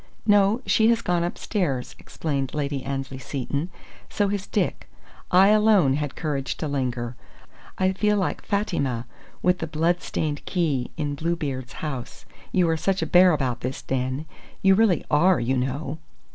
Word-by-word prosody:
"No, 205 +2 +4
she 220 - +4
has 230 -1 +3
gone 175 -1 +1
upstairs," 170 - -2
explained 140 -4 -3
Lady 140 -2 -2
Annesley 135 0 -4
Seton. 140 +5 -3 0.4
"So 205 -1 0
has 200 -1 -3
Dick. - - -1 0.4
I 190 +2 +6
alone 210 -9 +5
had 145 0 -2
courage 140 -4 -2
to 155 - -3
linger! 125 -4 -2 0.6
I 190 0 +2
feel 210 +2 +2
like 190 - -1
Fatima 140 - -1 0.4
with 180 0 +3
the 165 - -3
blood 165 +3 +1
stained 150 -2 -3
key, 150 -9 0
in 145 -2 -2
Bluebeard's 145 -5 -3
house, 135 -5 -6 0.3
you 180 -2 +3
are 165 0 +1
such 190 +1 0
a - - 0
bear 180 +3 +6
about 130 -6 -1
this 130 +2 -4
den 130 +3 -2 0.4
you 195 0 +6
really 200 -4 +3
are, 175 +5 +4
you 120 +3 0
know!" 135 +4 -2
155 Hz, 160 wpm, -24 LUFS, 135-185 Hz, 0.6 s, I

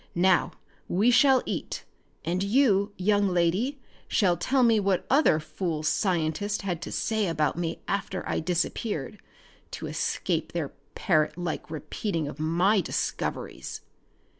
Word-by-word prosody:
Now 180 +1 +3 0.3
we 210 +7 +3
shall 265 +1 +5
eat, - - -4 0.4
and 175 +2 0
you, 205 -2 +3
young 205 +1 +2
lady, 185 +11 +1 0.3
shall 185 -4 +3
tell 255 +9 +1
me 230 -2 +5
what 195 -2 +1
other 270 - +5
fool 160 0 -3
scientists 180 +4 0
had 180 -4 -3
to - - -6
say 220 -2 0
about 155 -3 0
me 170 -1 -3
after 195 -1 -2
I - - 0
disappeared 180 +2 -2 0.5
to - - -6
escape - - -2
their - - -2 0.3
parrot 155 -4 +1
like 175 -3 -4
repeating 160 +2 -3
of 145 - -8
my 175 +6 +3
discoveries!" - - -3
185 Hz, 135 wpm, -27 LUFS, 165-210 Hz, 0.5 s, shall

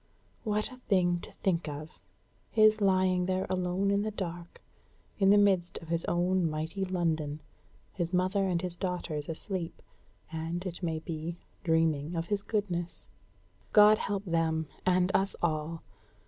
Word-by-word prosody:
What 215 +2 -1
a 255 - -10
thing 180 -7 +2
to - - -10
think 170 -4 -1
of, 150 +2 -8 0.5
his 215 -1 +5
lying 185 -2 +3
there 185 0 0
alone 185 +2 +1
in 200 0 +2
the 215 - -1
dark, 175 -4 -6 0.6
in 195 -1 +5
the 205 - +7
midst 190 -4 +3
of 165 - -10
his 170 0 0
own 175 0 +2
mighty 160 +5 -3
London; 160 -5 -1 0.5
his 170 -2 -2
mother 190 +2 +2
and 175 -1 0
his 175 -1 -4
daughters 175 -5 -3
asleep, 170 +1 -4 0.5
and, 165 +3 -3
it 175 -1 -5
may 165 -3 -1
be, 160 +1 -5 0.3
dreaming 160 -1 +1
of 165 0 -1
his 200 +3 -1
goodness. 180 -6 -3 0.6
God 210 0 +8
help 200 0 -2
them, 165 -2 +1 0.2
and 185 0 +3
us 195 +1 +2
all! 160 0 -1
180 Hz, 150 wpm, -30 LUFS, 165-195 Hz, 0.6 s, God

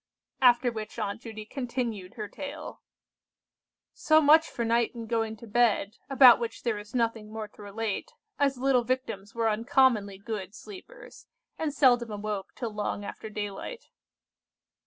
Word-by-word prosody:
After 245 -1 +5
which 220 -1 -7
Aunt 210 0 -3
Judy 220 -2 -8
continued 235 -6 -4
her 215 -3 -5
tale:— 285 +8 -8 1.1
"So 310 0 +4
much 315 +2 +6
for 235 - -3
night 235 +1 +1
and 230 -1 -6
going 225 -1 -1
to 235 - -11
bed, 220 -2 +1
about 260 -3 +8
which 230 -1 -5
there 225 -4 -1
is 210 +3 -11
nothing 230 -3 -1
more 220 -1 -5
to - - -16
relate, 215 - -4 0.3
as 280 -1 +2
the 250 - -11
little 265 -3 +4
Victims 225 -5 -3
were 230 -1 +1
uncommonly 225 -3 +2
good 200 -1 -6
sleepers, 425 - -12 0.3
and 315 -2 -1
seldom 245 -5 +4
awoke 210 -1 -5
till 230 -4 -4
long 205 -1 -3
after 220 - -7
daylight. 210 - -6
230 Hz, 155 wpm, -28 LUFS, 210-255 Hz, 1.1 s, about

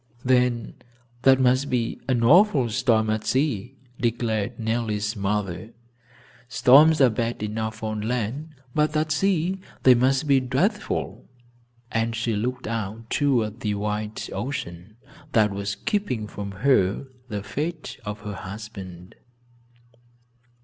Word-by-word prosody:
"Then 125 -2 +1 0.4
that 135 0 +5
must 130 +2 +3
mean 120 -3 -2
an 125 -3 +1
awful 150 - +5
storm 110 -2 +2
at 110 0 -1
sea," 130 -3 -1 0.3
reflected 115 -1 -1
Nellie's 110 -2 -1
mother. 100 0 -2 0.8
"Storms 150 +5 +6
are 130 -4 +6
bad 115 0 -2
enough 110 +1 -4
on 110 -1 -2
land, 125 +7 -3 0.2
but 155 0 +1
at 155 0 0
sea 185 +2 +1 0.2
they 130 - +8
must 130 +4 +2
be 140 -2 +4
dreadful!" 140 - -2 0.6
And 115 0 0
she 115 0 -1
looked 125 +4 -2
out 115 0 -4
toward 120 -6 +1
the 105 -3 -1
wild 105 +1 -3
ocean, 100 -7 -5 0.4
that 105 -2 +4
was 100 +1 -3
keeping 200 - -2
from 105 -1 -6 0.2
her 105 -4 +3 0.2
the 105 -2 -4
fate 150 +10 -4
of 105 0 -6
her 105 -1 -6
husband. 95 -3 -9
115 Hz, 125 wpm, -24 LUFS, 105-135 Hz, 0.8 s, they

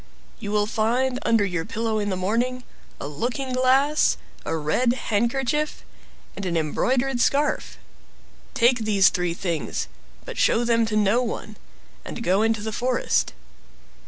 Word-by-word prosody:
You 205 -4 -5
will 210 0 +2
find 245 +4 0
under 225 -3 +3
your 175 -4 -2
pillow 220 +3 -2
in 205 -1 -1
the 190 - -1
morning 235 +7 -1 0.4
a - - -5
looking 245 - -3
glass, 265 +4 +3 0.3
a 160 - -2
red 235 +11 +1
handkerchief, 260 +6 -1 0.5
and 200 - -6
an 175 -3 -1
embroidered 245 - 0
scarf. 285 +4 +1 0.8
Take 245 +1 +4
these 210 -3 +4
three 180 -2 -1
things, 170 -4 -3 0.4
but - - -6
show 235 - +3
them 230 -1 +2
to 215 - -2
no 215 +3 +3
one, 235 -3 -4 0.5
and 230 - -6
go 200 +4 +3
to 225 -2 0
the 220 - -3
forest. 250 +3 0
230 Hz, 145 wpm, -24 LUFS, 200-255 Hz, 0.8 s, Take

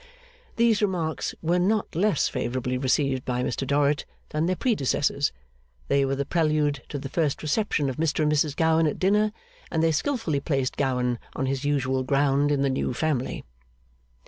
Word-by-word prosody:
These 230 -2 +3
remarks 175 -6 -1
were 175 +2 +2
not 205 +4 +1
less 185 -1 +2
favourably 125 +1 -2
received 130 0 +1
by 125 0 -1
Mr 130 +2 -2
Dorrit 145 +1 +2 0.3
than 155 +2 0
their 185 - +1
predecessors. 145 - +1 0.6
They 140 0 +3
were 135 0 0
the 140 +1 -2
prelude 150 -4 +1
to 145 - -4
the 135 - -5
first 150 0 -1
reception 155 -2 0
of 130 - -3
Mr 155 -1 +1
and 150 - +2
Mrs 150 -1 +1
Gowan 160 0 +3
at 150 - -2
dinner, 210 +3 +2 0.4
and 160 -1 0
they 165 - +4
skilfully 165 - 0
placed 135 -3 -1
Gowan 125 -3 0 0.2
on 135 - -1
his 135 +1 -2
usual 130 -2 +1
ground 140 +2 +2
in 140 -1 +1
the 140 - +2
new 130 -1 -1
family. 145 -4 -1
145 Hz, 170 wpm, -25 LUFS, 135-165 Hz, 0.6 s, they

